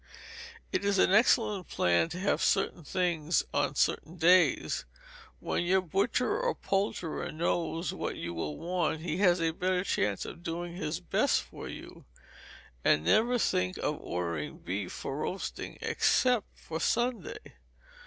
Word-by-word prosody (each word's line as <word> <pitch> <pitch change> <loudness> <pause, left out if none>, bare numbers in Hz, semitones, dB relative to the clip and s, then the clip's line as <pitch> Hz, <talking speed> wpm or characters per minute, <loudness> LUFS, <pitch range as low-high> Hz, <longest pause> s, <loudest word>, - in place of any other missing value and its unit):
It - - 0
is 200 0 +2
an 185 - +4
excellent 210 -3 +3
plan 90 - +2
to 175 - -6
have 200 +2 +1
certain 195 -3 +1
things 170 -1 0
on - - +1
certain 165 - 0
days. 175 +2 +4 0.6
When - - -1
your 190 +2 +3
butcher 200 - 0
or - - 0
poulterer 195 -4 -2
knows 165 +1 -1
what - - -3
you 85 - -5
will 75 -3 -4
want, 170 -2 -1
he 165 0 -2
has 180 -3 +4
a 165 -1 +1
better 180 +2 0
chance 105 - 0
of - - -9
doing 170 +1 -4
his 155 -1 -3
best 180 - +1
for - - -9
you; - - -10 0.8
and 75 - +4
never 235 - +3
think 90 - 0
of - - -2
ordering 85 -4 -3
beef 90 +1 -4
for 135 - -5
roasting 185 +5 -4
except 250 -5 +2
for 160 0 -6
Sunday. 240 +7 0
175 Hz, 145 wpm, -30 LUFS, 155-195 Hz, 0.8 s, an